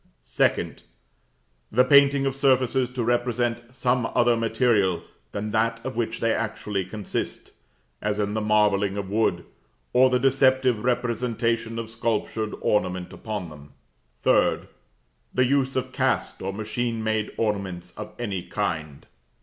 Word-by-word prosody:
2d. - - 0 0.9
The 125 - +5
painting 140 +1 +5
of 135 - 0
surfaces 130 -2 +2
to 125 -1 -3
represent 120 0 0
some 125 -2 0
other 120 0 +4
material 115 -5 +1 0.3
than 105 +1 -4
that 115 +1 +1
of 130 -2 -4
which 115 0 -2
they 115 -1 +2
actually 105 -3 -2
consist 105 +2 -4 0.5
(as 105 0 -1
in 105 -1 -1
the 110 - -1
marbling 105 -2 +2
of 100 -1 -4
wood), 110 +1 +1 0.5
or 130 +1 +6
the 125 - +3
deceptive 130 -3 +3
representation 115 -2 0
of 115 -1 -4
sculptured 110 -1 -2
ornament 90 -3 0
upon 105 -6 -5
them. 75 -1 -14 0.5
3d. - - +3 0.7
The 130 - +4
use 135 0 +1
of 130 - -2
cast - - 0
or 95 - -2
machine 110 +2 -3
made 110 -1 0
ornaments 95 -5 -2
of 105 0 -8
any 100 -6 -3
kind. 75 -4 -4
115 Hz, 135 wpm, -25 LUFS, 105-125 Hz, 0.9 s, or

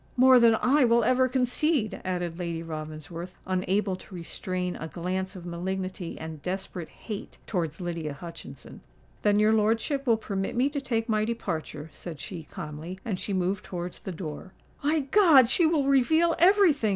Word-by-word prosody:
"More 255 0 +7
than 230 -1 +6
I 270 +5 +3
will 235 -1 +4
ever 255 +3 +3
concede," 250 -2 0
added 175 -2 -3
Lady 170 -2 -3
Ravensworth, 155 +2 -7
unable 190 +1 0
to 185 - -12
restrain 180 +1 -4
a 160 - -5
glance 185 +3 -3
of 180 -2 -9
malignity 185 +1 -4
and 160 -2 -7
desperate 185 -1 -4
hate 210 -3 -8
towards 165 -5 -2
Lydia 170 -4 -3
Hutchinson. 165 +3 -10 0.4
"Then 205 -1 +3
your 215 +1 +4
lordship 230 +6 +1
will 230 -2 +5
permit 195 -2 -3
me 255 +4 +3
to 285 -1 -3
take 230 -4 -1
my 215 -2 +1
departure," 165 -9 -4
said 160 -1 -8
she, 165 +2 -7
calmly; 155 +4 -7
and 200 -6 -2
she - - -4
moved 185 +1 0
towards 175 -1 -6
the 190 - -6
door. 165 +1 -7 0.3
"My 305 +2 +2
God! 280 - +6
she 320 +7 +4
will 310 -4 +2
reveal 315 +5 +4
every 380 -1 +6
thing!" 230 -7 -1
195 Hz, 170 wpm, -27 LUFS, 175-250 Hz, 0.4 s, More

